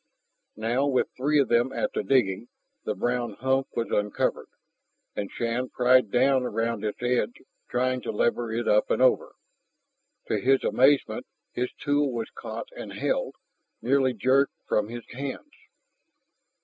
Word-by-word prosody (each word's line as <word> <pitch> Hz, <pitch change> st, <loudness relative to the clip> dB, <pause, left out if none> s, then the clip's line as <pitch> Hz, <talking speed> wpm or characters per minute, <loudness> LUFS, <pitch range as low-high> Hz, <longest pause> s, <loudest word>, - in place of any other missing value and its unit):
Now, 120 Hz, +6 st, 0 dB
with 130 Hz, -3 st, +1 dB
three 145 Hz, +4 st, +1 dB
of 140 Hz, -, +4 dB
them 120 Hz, +2 st, +2 dB
at -, -, -2 dB
the -, -, 0 dB
digging, 120 Hz, -5 st, +1 dB, 0.4 s
the -, -, -1 dB
brown 120 Hz, -2 st, -1 dB
hump 130 Hz, +4 st, 0 dB
was 115 Hz, -, -2 dB
uncovered, 105 Hz, 0 st, -1 dB, 0.7 s
and 100 Hz, -1 st, -3 dB
Shann 120 Hz, +2 st, -2 dB
pried 125 Hz, -2 st, +4 dB
down 130 Hz, +3 st, +3 dB
around 115 Hz, -2 st, -2 dB
its 105 Hz, +3 st, -4 dB
edge, 120 Hz, -2 st, 0 dB, 0.3 s
trying 130 Hz, +1 st, 0 dB
to -, -, -3 dB
lever 120 Hz, +1 st, 0 dB
it 115 Hz, +1 st, -2 dB
up 105 Hz, -, +3 dB
and -, -, +1 dB
over. 130 Hz, 0 st, +3 dB, 0.9 s
To -, -, 0 dB
his 135 Hz, +1 st, +3 dB
amazement, 135 Hz, +2 st, +2 dB, 0.2 s
his 125 Hz, +1 st, -2 dB
tool 145 Hz, -1 st, 0 dB
was 115 Hz, -2 st, -4 dB
caught -, -, -7 dB
and -, -, -7 dB
held, -, -, -1 dB, 0.4 s
nearly 130 Hz, 0 st, +2 dB
jerked 130 Hz, +6 st, +2 dB
from 105 Hz, 0 st, +1 dB
his 120 Hz, 0 st, -8 dB
hands. 140 Hz, -, -6 dB
125 Hz, 150 wpm, -26 LUFS, 115-135 Hz, 0.9 s, of